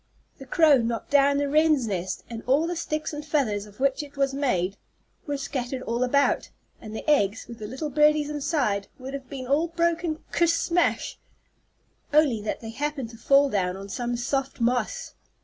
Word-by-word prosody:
The 270 - -10
crow 305 -4 +5
knocked 230 +1 -3
down 280 0 +5
the 285 0 +1
wren's 305 -2 +3
nest, 185 -3 -3
and 230 -1 -6
all 280 +5 +3
the 350 +1 -2
sticks 310 -2 -3
and 295 0 -5
feathers 245 -9 0
of 210 +2 -17
which 270 +1 +1
it 290 -1 -11
was 275 -1 +1
made 200 -10 0 0.5
were 290 -1 -1
scattered 265 -2 -4
all 235 +2 -1
about, 280 +3 +2 0.3
and 215 -1 -8
the - - -7
eggs, 225 -8 +2
with 235 0 -10
the 210 - -5
little 270 +6 -4
birdies 300 +1 +4
inside, 275 -9 -1
would 265 0 -8
have 270 -2 -7
been 265 -2 -6
all 290 +6 +2
broken 335 -1 -1
ker 340 - +3
smash, 335 +1 +1 0.9
only 290 -7 +4
that 210 - -3
they 225 -1 -6
happened 275 -2 -3
to 230 - -12
fall 275 +4 +4
down 190 -6 -1
on 195 +1 -9
some 240 +2 -2
soft 270 +3 -2
moss. 250 - -1
275 Hz, 185 wpm, -26 LUFS, 235-300 Hz, 0.9 s, crow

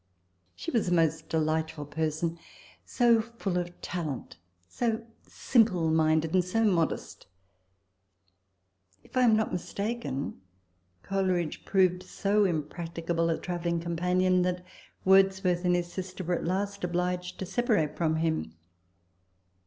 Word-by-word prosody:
She 90 - -5
was 230 -5 +1
a - - +2
most 160 -1 +1
delightful 160 -1 -1
person 160 +2 -2 0.4
so 235 -2 +3
full 220 -5 -3
of 175 0 -6
talent, 155 - -4 0.3
so 230 -2 -1 0.2
simple 190 -10 +2
minded, 160 0 +2
and 185 -1 +4
so 225 +6 0
modest! 175 - 0 1.8
If - - -18
I 255 - +4
am 235 -3 +6
not 220 0 0
mistaken, 200 - -3 0.6
Coleridge 185 -4 -1
proved 185 -2 +3
so 200 +2 +1
impracticable 165 0 -2
a 165 - +1
travelling 175 -1 -2
companion, 180 +2 +1
that 180 0 -1 0.4
Wordsworth 190 -2 +4
and 180 0 +4
his 175 0 -2
sister 185 0 -5
were 180 +1 -1
at - - -5
last 200 +3 -2
obliged 180 +1 -2
to 190 - -4
separate 190 -7 +1
from 160 -2 +1
him. 160 - -1
180 Hz, 125 wpm, -29 LUFS, 165-195 Hz, 1.8 s, am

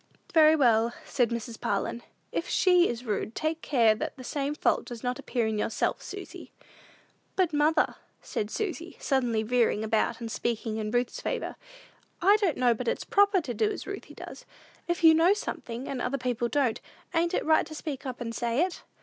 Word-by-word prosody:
"Very 315 -1 +7
well," 235 -5 +3
said 245 -4 +1
Mrs. 235 -1 -5
Parlin; 200 +4 -1 0.3
"if - - -3
she 360 -1 +4
is 240 +1 -5
rude, 215 0 -2
take 315 +1 -1
care 230 -6 +4
that 215 - -5
the 255 - -9
same 285 +2 -2
fault - - +1
does 240 -2 -8
not 250 0 -2
appear 240 -3 -1
in 220 -1 -1
yourself, 225 - -1
Susy." - - -9 0.8
"But, 360 -4 +1
mother," 300 +2 +3 0.3
said 210 - -3
Susy, 345 - -4
suddenly 245 -5 +1
veering 230 -2 +2
about 220 +2 0
and 230 -2 -5
speaking 225 -1 -2
in 215 -1 -2
Ruth's 245 +2 -1
favor, - - -3 0.6
"I 400 +4 +5
don't 390 -8 0
know 245 -2 +4
but 240 +2 -5
it's - - 0
proper 405 -2 +4
to 255 -6 -4
do 215 -1 +1
as - - -5
Ruthy 400 0 -7
does. - - -9 0.4
If 345 0 -1
you 325 -1 +9
know 335 +5 +5
something, 240 - -5
and 260 -3 -3
other 255 +3 -1
people 245 -2 -1
don't, 265 -5 +1 0.3
ain't 340 0 +1
it - - -1
right 315 0 +3
to 310 - -9
speak 300 -3 -5
up 250 -1 -5
and 230 -2 -4
say 235 +4 0
it?" 370 - -7
250 Hz, 190 wpm, -28 LUFS, 230-320 Hz, 0.8 s, you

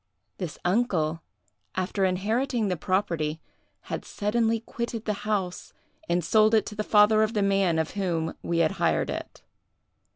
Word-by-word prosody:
This 180 -6 -4
uncle, 175 -6 +1 0.5
after 185 +1 0
inheriting 215 +5 0
the 180 - 0
property, 170 -4 -1 0.4
had - - -5
suddenly 225 +2 0
quitted 230 0 -5
the 210 - 0 0.2
house 190 -4 -2 0.4
and 175 -1 +1
sold 215 +4 +4
it 220 - +3
to 210 - -7
the 215 - -2
father 210 +1 +5
of 220 +1 +1
the 205 - +2
man 195 -4 +2
of 160 -1 -1
whom 170 -5 -1
we 170 - -1
had 155 - +1
hired - - +2
it. - - -7
200 Hz, 155 wpm, -26 LUFS, 175-215 Hz, 0.5 s, father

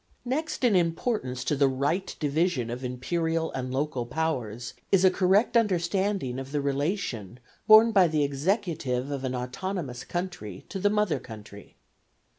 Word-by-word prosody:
Next 285 +4 -2
in 235 -5 +4
importance 165 - 0
to 150 - 0
the 140 0 +4
right 145 +8 -1
division 150 -5 0
of 125 +2 -5
Imperial 160 +6 -1
and 130 -1 -4
local 130 -3 -2
powers 125 -6 -3 0.2
is 190 -1 +5
a 185 - +6
correct 195 +6 +2
understanding 190 - +1
of 135 0 -7
the 145 - 0
relation 140 - -2 0.3
borne 220 +1 +8
by 190 -4 +5
the 155 -2 +1
executive 145 - -1
of 140 -2 -3
an 130 -1 -2
autonomous 125 +1 -4
country 175 - -5
to 195 - -4
the 205 - +3
mother 210 -8 +1
country. 105 -4 -12
150 Hz, 150 wpm, -27 LUFS, 125-190 Hz, 0.3 s, borne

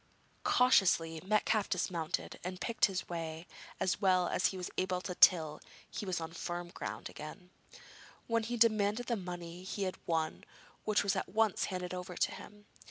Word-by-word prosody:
Cautiously 175 -10 +4
Metcalfe 215 +1 +2
dismounted 170 -2 -2
and 180 +1 -4
picked 225 +5 +2
his 190 -2 -3
way 165 -1 -5 0.3
as 185 +2 0
well 185 -2 +4
as 185 - +2
he 190 - -4
was 180 - -5
able 185 -1 0
till 175 -4 +4 0.3
he 205 - -5
was 185 -2 0
on 165 0 -6
firm 175 0 -4
ground - - -5
again, 180 +4 -9 0.7
when 230 -1 +1
he 240 +2 -3
demanded 215 0 +3
the 235 - 0
money 175 -3 -6
he 195 +1 -3
had 185 -1 -3
won, 160 -2 0 0.4
which 215 -1 +3
was 200 0 +1
at 190 - -2
once 215 +1 +2
handed 180 -1 -4
over 180 0 -5
to - - +2
him. 210 0 -11
185 Hz, 165 wpm, -33 LUFS, 175-205 Hz, 0.7 s, Cautiously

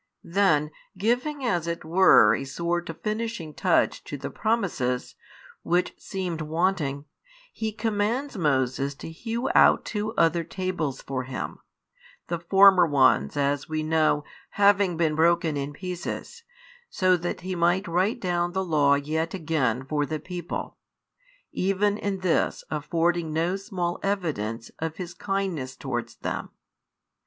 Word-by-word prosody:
Then, 165 -5 +2 0.3
giving 250 +7 0
as 175 -8 0
it 170 -1 -4
were 165 - +6
a 125 - -2
sort 170 +5 -2
of 165 - -8
finishing 215 -7 -3
touch 180 0 +1
to 145 - -5
the 140 +1 -6
promises, 175 - -1 0.5
which 175 +1 +1
seemed 180 -4 -4
wanting, 155 -3 -1 0.5
He 220 -1 -3
commands 220 +5 -1
Moses 135 -4 0
to 160 - -8
hew 230 +8 -3
out - - +5
two 215 0 -3
other 165 0 +3
tables 175 -6 -3
for 130 -2 -3
Him, 130 0 -5 0.7
the 170 - -1
former 190 0 +6
ones 140 0 +3
as 140 0 0
we 155 0 -1
know 155 -1 +2 0.3
having 200 -3 +4
been 160 -2 +2
broken 165 0 +2
in 140 0 -3
pieces, 180 - -6 0.5
so 185 -1 +3
that 175 +1 -4
He 185 +1 -4
might 175 +3 +1
write 185 +8 +1
down 175 -3 -1
the 190 0 -1
Law 145 -4 +4
yet 160 +4 -2
again 145 -8 0
for 145 0 -1
the 155 -1 -3
people; 175 +2 -6 0.7
even 200 +2 +1
in 195 -2 -2
this 180 -3 +1
affording 165 +2 0
no 165 +4 0
small 180 -3 -3
evidence 145 - -2
of 160 0 -3
His 180 -2 -6
kindness 190 -11 -3
towards 120 -4 -4
them. - - -4
170 Hz, 140 wpm, -26 LUFS, 150-195 Hz, 0.7 s, were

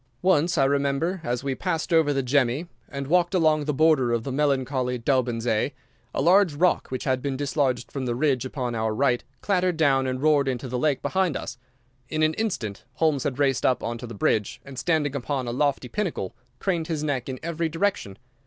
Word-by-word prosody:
Once, 175 -2 +3
I 135 - +4
remember, 140 +6 0
as 120 0 -2
we 135 -1 -1
passed 165 +2 -2
over 160 -3 +4
the 135 -1 0
Gemmi, 130 +4 +1 0.2
and 140 0 -5
walked 175 +4 +2
along 155 -4 +3
the 150 - 0
border 145 -5 +3
of 115 -1 0
the 135 - -4
melancholy 130 -2 0
Daubensee, 120 -1 0 0.4
a - - -1
large 180 -1 +5
rock 180 +5 +2
which 130 - -4
had 130 -2 0
been 135 -1 -2
dislodged 135 -3 -1
from 135 -2 -3
the 120 - -1
ridge 135 -2 +1
upon 130 -2 -3
our 110 -1 -1
right 125 0 +2 0.2
clattered 185 -4 +1
down 135 -4 +3
and 130 0 -2
roared 150 -3 +4
into 130 0 -2
the 125 0 -2
lake 145 -1 +1
behind 185 -6 +1
us. 120 - -7 0.5
In 155 0 0
an 155 0 +3
instant 155 - -3
Holmes 155 -3 +1
had 135 -3 -1
raced 135 -3 +1
up 130 - +2
on 115 0 -3
to 125 - -7
the 115 - -8
ridge, 105 +1 +1
and, 135 -2 -7
standing 155 -4 0
upon 135 -1 -2
a - - -1
lofty 140 0 0
pinnacle, 180 - -3 0.2
craned 170 -2 -1
his 155 -3 -2
neck 135 -4 -2
in 130 - -5
every 165 0 -1
direction. 165 - -1
140 Hz, 205 wpm, -25 LUFS, 125-160 Hz, 0.5 s, large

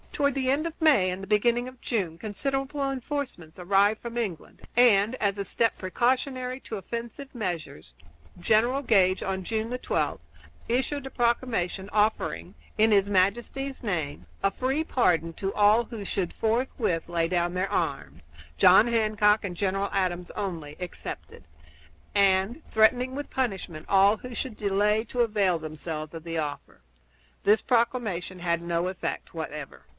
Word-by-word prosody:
Toward 280 -1 +1
the 260 -1 +1
end 300 +4 +1
of 330 - -9
May 285 - +4
and 190 +2 -5
beginning 235 +4 +2
of 255 -1 -11
June 185 -11 -2
considerable 270 - -3
re 275 - 0
enforcements 255 - -5
arrived 200 +4 +2
from 235 0 -6
England, 200 -9 -4
and, 225 -1 +5
as 200 -4 0
a 200 - -3
step 230 +4 0
preparatory 255 +5 -1
to 220 - -6
offensive 235 +6 -7
measures, 165 - -5 0.5
General 225 +9 +2
Gage, 190 -6 +3
on 190 -1 -2
June 220 +4 -2
12, 250 - -1 0.5
issued 265 +3 -1
a - - -5
proclamation 235 -6 0
offering, 210 - 0 0.2
in 220 +1 +4
his 200 -1 +4
Majesty's 235 +8 0
name, 160 -9 -3 0.2
a 195 - +3
free 265 +8 -1
pardon 170 - +1
to 195 +3 -3
all 210 +3 +4
who 225 -3 -7
should 190 -2 -2
forthwith 225 -6 0
lay 170 -1 0
down 175 0 0
their 185 +1 -1
arms, 80 - -3 0.3
John 190 - +7
Hancock 215 -2 +3
and 185 -3 -4
General 195 +1 -1
Adams 180 -2 -1
only 165 -7 -5
excepted, 180 -1 -7 0.7
and 195 +7 +3
threatening 250 +4 +3
with 290 +1 -5
punishment 190 -11 -3
all 200 +2 +5
who 250 +2 -9
should 235 -4 -4
delay 210 +2 +2
to 245 +2 -1
avail 205 -6 +2
themselves 155 0 -6
of 165 -1 -8
the 165 -1 -4
offer. 145 - -6 0.6
This 210 +2 +4
proclamation 230 -7 0
had 170 -1 0
no 170 +1 -1
effect 185 -1 -4
whatever. 150 -3 -7
205 Hz, 150 wpm, -27 LUFS, 180-240 Hz, 0.7 s, John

